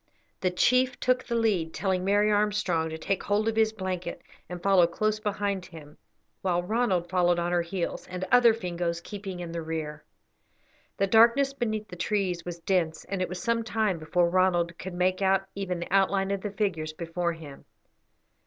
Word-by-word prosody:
The 185 - +1
chief 250 +7 +2
took 255 0 +1
the 235 - -3
lead, 200 -8 +1
telling 190 -2 0
Mary 205 +2 +3
Armstrong 205 -6 +1
to 160 - -5
take 195 +4 -1
hold 210 +2 0
of 225 - 0
his 220 -1 +3
blanket 185 -4 -5 0.3
and 180 0 -5
follow 185 -1 +4
close 215 +5 -1
behind 200 -3 -2
him, 155 -4 -12 0.5
while 175 -2 0
Ronald 190 -4 0
followed 175 -1 +2
on 175 0 -1
her 175 -1 +2
heels, 170 +1 -4
the 185 +1 -5
other 240 -2 +7
Fingoes 175 -5 -2
keeping 195 0 -7
in 170 -1 -6
the 170 0 -4
rear. 155 -2 -5 0.9
The 195 - +2
darkness 235 +7 +5
beneath 215 -5 -2
the 180 - -9
trees 180 -2 -1
was 175 -1 -6
dense, 165 -4 0
and 195 -2 -2
it 185 - -1
was 180 0 -5
some 230 0 +1
time 215 -5 0
before 170 +2 +1
Ronald 175 -1 +2
could 185 0 -6
make 185 +2 +1
out 195 0 +2
even 190 -3 -3
the 175 - -5
outline 195 0 +2
of 200 -1 -1
the 210 - -3
figures 185 -7 -2
before 170 +1 -2
him. 155 -4 -11
185 Hz, 185 wpm, -27 LUFS, 175-210 Hz, 0.9 s, other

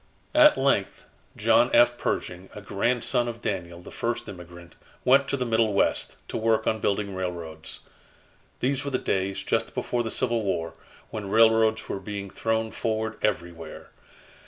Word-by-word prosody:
At 300 0 +7
length, 135 -8 0 0.3
John - - +4
F. - - +6
Pershing, 90 +1 -3
a 105 - -7
grandson 120 +4 0
of 115 -1 -5
Daniel, 90 -4 -4
the - - -11
first 115 -1 -3
immigrant, 85 -3 -11 0.3
went 135 +2 +5
to 140 - -1
the 125 - -1
Middle 115 -2 +2
West, - - +1
to - - -3
work 110 0 +1
on 110 - +1
building 100 -1 -1
railroads. 85 -4 -5 0.8
These 135 +1 0
were 140 - -3
the 130 - 0
days, 95 -3 -1
just 115 +3 -1
before 120 - -1
the 115 - -3
Civil 120 -1 0
War, 85 -5 -2 0.4
when 105 -3 -5
railroads 110 0 +4
were - - -3
being 100 0 -6
thrown 110 0 -1
forward 110 0 -2
everywhere. 85 -6 -3
110 Hz, 155 wpm, -26 LUFS, 95-115 Hz, 0.8 s, At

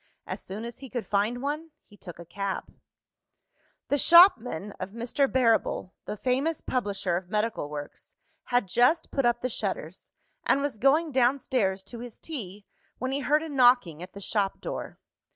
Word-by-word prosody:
As - - -5
soon 210 +4 -7
as 235 - -8
he 270 - -9
could 240 -2 -4
find 215 +5 0
one, 305 +3 -3 0.2
he 205 - -18
took 175 -4 -11
a 170 - -10
cab. 195 +2 -4 1.2
The 285 - +2
shopman 250 - +6
of 185 - -4
Mr. 240 +4 0
Barrable, 230 -6 +2
the 210 - -5
famous 270 +8 0
publisher 200 -7 -1
of 180 0 -7
medical 210 -7 -1
works, 145 -1 -8 0.3
had 245 -4 +1
just 245 - +2
put 275 -3 +2
up 240 0 +1
the 255 - 0
shutters, 190 -6 -4 0.3
and - - +3
was 280 -6 -3
going 300 +6 +3
downstairs 245 -6 +1
to 235 - -9
his 240 -1 -8
tea, 210 - -7 0.3
when 260 +1 -3
he 275 - 0
heard 295 +3 +2
a 320 - -6
knocking 245 - +4
at 180 +1 -9
the 200 - -9
shop 200 -1 -1
door. - - -6
240 Hz, 170 wpm, -27 LUFS, 200-270 Hz, 1.2 s, shopman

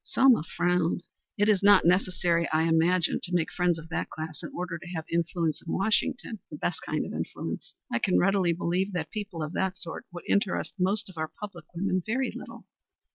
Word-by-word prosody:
Selma 260 - +5
frowned. 175 +1 0 0.3
"It 205 0 +3
is 210 -3 +4
not 205 0 +7
necessary, 175 -1 +2
I 160 0 +3
imagine, 165 +2 +3
to 180 0 -3
make 165 -2 +1
friends 175 -2 +2
of 160 0 -10
that 170 - -2
class 155 0 -6
in - - -6
order 175 -1 -4
to 175 - -11
have 160 -1 -3
influence 170 -2 0
in 165 - -6
Washington, 220 +2 0
the 150 - -7
best - - -2
kind - - -2
of - - -6
influence. - - -5 0.2
I 115 - +2
can 185 - +2
readily 195 -2 +3
believe 180 +4 -1
that 160 -4 -3
people 200 -7 -4
of 155 +2 -5
that 190 -1 -1
sort 170 -3 -6
would 175 0 -8
interest 200 -1 +1
most 200 +3 +2
of 185 -4 -10
our 155 - 0
public 180 -3 -9
women 185 +1 0
very 255 +6 0
little." - - -9
180 Hz, 200 wpm, -28 LUFS, 165-195 Hz, 0.3 s, not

